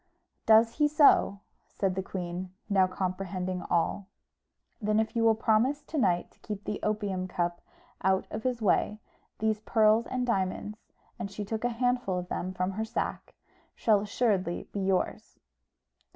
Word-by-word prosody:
"Does 225 +1 +5
he 295 0 +4
so?" 290 -9 +4 0.3
said 195 -2 -1
the 190 - -2
queen, 180 -1 -5 0.2
now 195 -3 +4
comprehending 185 0 -3
all. 175 +3 0 0.7
"Then 215 +1 +2
if 220 +2 -1
you 230 - +2
will 225 -1 +5
promise 230 +6 +2
to - - -9
night 180 -7 +1
to - - -29
keep 210 -2 -6
the 210 - -3
opium 205 -3 -1
cup 175 -1 -2 0.4
out 190 0 +2
of 215 - -4
his 245 -1 -2
way, 210 +1 +2 0.4
these 220 -1 0
pearls 220 +1 +3
and 255 -1 -1
diamonds," 210 -1 -1 0.4
and 200 - -4
she 205 +1 -5
took 220 +2 -4
a 245 - +2
handful 245 -5 0
of 180 0 -5
them 185 - -3
from 185 0 -1
her 215 +3 -3
sack, 220 - -4 0.4
"shall 215 -3 +3
assuredly 200 -4 0
be 205 - -4
yours." 190 -1 -1
205 Hz, 160 wpm, -29 LUFS, 185-225 Hz, 0.7 s, Does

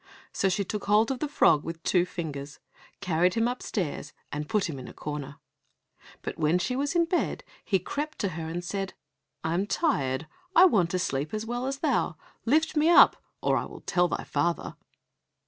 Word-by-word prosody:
So 195 - +2
she 195 +2 0
took 210 +3 -4
hold 215 +4 +4
of 260 - -3
the 300 - -1
frog 160 - +4
with 165 0 -6
two 180 -1 +2
fingers, 145 -5 -6 0.4
carried 180 -1 +2
him 230 0 +2
upstairs, 190 - -3 0.2
and 150 +1 -4
put 210 -2 +1
him 145 -5 -5
in 125 - -8
a - - -11
corner. 145 -1 -5 0.9
But - - -5
when 155 +2 +3
she 250 +8 -1
was 285 +4 -1
in 340 -1 +4
bed 345 +1 -1 0.2
he 195 - +2
crept 295 - -4
to 200 - +1
her 160 -1 -5
and 175 +2 -4
said, 195 +1 -3 0.5
"I 160 - 0
am 190 +4 0
tired, 145 - 0 0.3
I 360 - +9
want 195 - +4
to 185 - 0
sleep 150 0 -2
as 215 +1 -3
well 245 +2 -2
as 275 +1 -4
thou, 255 - +1 0.3
lift 315 +7 +2
me 305 +2 +4
up 345 - +8 0.3
or - - +3
I - - -1
will - - -11
tell 175 -1 +2
thy - - -3
father." 170 0 -1
185 Hz, 200 wpm, -28 LUFS, 160-250 Hz, 0.9 s, I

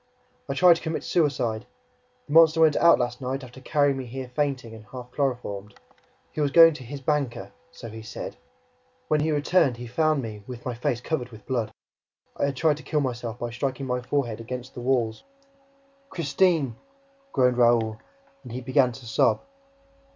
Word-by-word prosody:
"I 135 - -1
tried 175 +1 +6
to - - -10
commit 160 -1 -3
suicide! 125 -8 0 0.6
The 145 - -7
monster 165 0 +7
went 155 -2 +5
out 170 - +6
last 125 +1 -2
night, 130 +2 -3
after 130 +1 -12
carrying 145 -1 +2
me 130 -2 -5
here 130 +1 -6
fainting 135 -6 -1
and 110 -1 -11
half 125 +3 -10
chloroformed. 120 -8 -3 0.6
He 155 - -3
was 145 - +2
going 165 +2 +8
TO 130 - -9
HIS 140 +3 -7
BANKER, 140 -3 -1 0.2
so 120 - -10
he 110 0 -8
said!... 110 - -7 0.7
When 155 - +3
he 155 +2 +1
returned 145 -3 +2
he 120 - -7
found 155 +3 +1
me 105 -2 -7
with 125 -2 -8
my 125 - -2
face 120 0 -2
covered 125 -4 -2
with 110 -3 -14
blood... 120 -5 -1 0.6
I - - 0
had 140 -1 -1
tried 150 +2 +2
to 150 - -11
kill 150 - 0
myself 120 -3 -3
by 120 -1 -4
striking 135 +2 -3
my 125 -1 -1
forehead 125 -3 -1
against 125 +2 -6
the 120 - -7
walls." 120 -3 0 0.9
"Christine!" 155 - +1 0.5
groaned 125 -1 +2
Raoul; 115 -2 +3 0.4
and 125 - -11
he 125 - -4
began 130 0 +3
to 120 +1 -12
sob. 115 - +2
130 Hz, 180 wpm, -25 LUFS, 120-145 Hz, 0.9 s, going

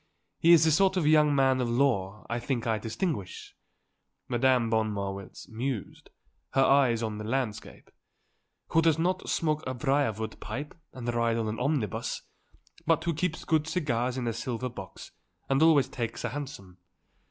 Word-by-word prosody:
He 170 - +5
is 170 -2 +8
the 160 - +4
sort 190 +4 +3
of 175 - +1
young 150 -1 +5
man 135 -1 +3
of 120 - -1
law, 115 -6 0
I 120 +1 -2
think 120 -1 -2
I 110 -2 0
distinguish," 115 - -4 0.7
Madame 125 -1 +2
von 110 -1 +1
Marwitz 100 -1 -6
mused, 115 0 -5 0.5
her 135 - +5
eyes 130 -5 +4
on 110 -1 -3
the - - -5
landscape, 115 -1 -4 0.8
"who 165 - +4
does 160 -2 +3
not 180 +3 -1
smoke 155 -1 0
a 130 - -3
briar 135 0 +1
wood 110 +1 -6
pipe 130 +8 -6 0.2
and 120 -2 -4
ride 115 -1 +1
on 115 -1 -1
an 110 +1 -3
omnibus, 125 - -1 0.6
but 165 -1 +3
who 170 -1 0
keeps 165 +1 -2
good 155 -1 +1
cigars 130 -7 -1
in 125 - -2
a 115 - 0
silver 120 +2 -3
box 95 -6 -10 0.4
and 135 +1 +2
always 160 -4 +5
takes 115 -1 -4
a - - -1
hansom. 100 -11 -8
130 Hz, 170 wpm, -28 LUFS, 115-150 Hz, 0.8 s, is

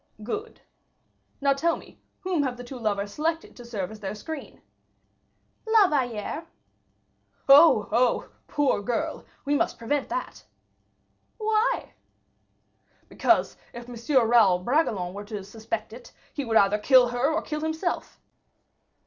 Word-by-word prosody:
"Good. 420 - -5 0.8
Now 280 0 +4
tell 330 +5 +1
me - - -16 0.2
whom 365 -4 0
have 255 -3 -2
the 245 - -8
two 250 +1 -9
lovers 205 -2 -2
selected 325 +2 -2
to 245 - -11
serve 210 -6 -5
as 215 - -10
their 195 0 -5
screen?" 300 +7 -8 1.0
"La 440 -3 +6
Valliere." 265 +3 -2 1.0
"Oh, 275 -7 +7
oh, 240 +2 +2 0.2
poor 285 -7 +1
girl! 235 +2 -3 0.2
We 285 - +1
must 290 - 0
prevent 275 +5 -2
that!" - - -5 0.9
"Why?" 440 +3 0 1.2
"Because, - - +1 0.2
if 240 0 -9
M. 245 +1 +1
Raoul 220 -6 +5
Bragelonne 195 - 0
were 205 +1 -7
to 205 -2 -6
suspect 220 +1 -5
it, 240 +1 -12 0.2
he 285 - -3
would 225 -1 +2
either 200 +1 +4
kill 250 +2 +5
her 245 +5 0
or 320 - -1
kill 305 -1 -4
himself." 320 +3 -3
245 Hz, 135 wpm, -26 LUFS, 215-305 Hz, 1.2 s, Oh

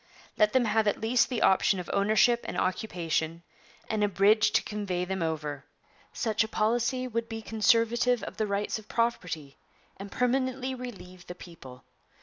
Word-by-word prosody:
Let 210 0 +3
them 260 -2 +3
have 215 0 +1
at 205 - +1
least 235 +3 +2
the 245 -4 -1
option 190 0 +3
of 180 - -6
ownership 215 +4 +3
and - - -4
occupation, 170 -4 -2 0.4
and 215 -1 -1
a - - +4
bridge 205 +3 +4
to - - +3
convey 195 -4 -3
them 190 0 -3
over. 150 -3 -3 0.5
Such 220 -2 0
a - - -4
policy 240 +4 0
would 230 -1 -3
be 225 -1 -6
conservative 230 +3 +2
of - - -7
the 215 - 0
rights 200 +2 -2
of 215 - -17
property 170 -12 -2 0.4
and 195 +1 -9
permanently 260 +1 0
relieve 195 -8 -9
the 180 - -7
people. 135 -8 -13
215 Hz, 165 wpm, -28 LUFS, 180-235 Hz, 0.5 s, a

